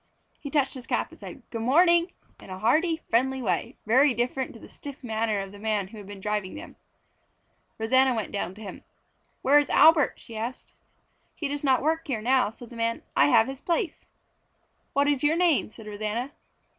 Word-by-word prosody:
He 285 - -7
touched 275 -2 +1
his 260 -1 -10
cap - - -1
and - - -16
said 270 - -10
"Good 230 - -4
morning!" 340 +7 +4 0.3
in - - -14
a 185 - -6
hearty, 320 - +1
friendly 265 +3 +2
way, 245 - -2
very 255 +4 +4
different 250 +3 -1
to 230 - -12
the - - -12
stiff 280 -2 -10
manner 220 -2 -1
of 195 0 -7
the 205 - -12
man 210 -3 -1
who 220 0 -11
had 200 - -11
been 205 -1 -9
driving 210 -1 -3
them. - - -10 1.0
Rosanna 260 +3 +3
went 220 -3 -3
down 190 -2 -3
to 215 - -13
him. 195 - -9 0.6
"Where 285 +3 +6
is 290 - -1
Albert?" 315 -2 +6
she 230 - -12
asked. 230 +4 -6 0.6
"He 305 - -3
does 290 +1 -4
not 265 -2 +3
work 320 +2 0
here 250 -6 -1
now," 250 +1 +2
said 235 +2 -13
the - - -10
man. 230 0 -1
"I 140 - +5
have 220 +9 +5
his 270 +2 -7
place." 340 0 -2 0.9
"What 280 +1 +2
is 290 -2 +1
your 300 +2 +3
name?" 340 -8 +2
said 220 0 -13
Rosanna. 215 +5 -3
250 Hz, 200 wpm, -26 LUFS, 215-285 Hz, 1.0 s, Where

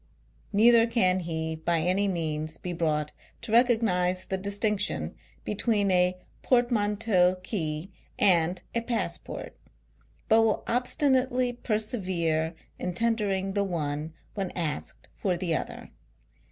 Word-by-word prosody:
" - - -35
Neither 230 +2 +6
can 190 -6 +2
he 160 -2 -3
by 165 +1 0
any 185 +4 +2
means 155 -3 -2
be 180 - -5
brought 150 -3 -1 0.3
to - - -6
recognise 220 -7 +3
the 190 - -2
distinction 205 +1 0 0.3
between 210 -1 0
a 180 0 +3 0.2
portmanteau 210 -6 +2
key 160 -3 -3 0.3
and 175 -1 +3
a 235 - 0
passport, 225 -7 -4 0.7
but 220 +1 +5
will 225 -2 +1
obstinately 255 0 +1
persevere 185 -9 -1 0.2
in 180 -1 -3
tendering 200 -4 0
the 200 0 +1
one 155 -4 -3 0.2
when 195 -3 -2
asked 165 -4 -4
for 185 -3 0
the 170 -2 0
other. - - -5
190 Hz, 120 wpm, -27 LUFS, 170-225 Hz, 0.7 s, Neither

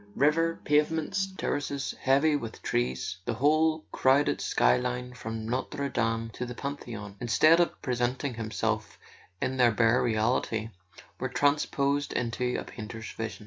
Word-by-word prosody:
River, 165 +4 +2
pavements, 160 +6 +1
terraces 140 -1 -2
heavy 140 +3 +4
with 115 -6 -5
trees, 65 +8 -1
the - - -1
whole 155 +5 +2
crowded 135 +2 +3
sky - - +3
line 125 0 -3
from 115 -2 -5
Notre 140 +4 -2
Dame 115 -2 -1
to 115 - -5
the 125 -1 -6
Pantheon, 120 -8 -6
instead 155 +8 +5
of 175 - +1
presenting 125 +2 -1
themselves 110 -1 -2 0.4
in 130 - -1
their 120 -2 +5
bare 115 +2 +3
reality, 110 0 0 0.5
were 130 - -2
transposed 145 0 +1
into 125 +1 -1
a - - -5
painter's 110 0 -8
vision. 110 0 -5
125 Hz, 140 wpm, -28 LUFS, 115-145 Hz, 0.5 s, instead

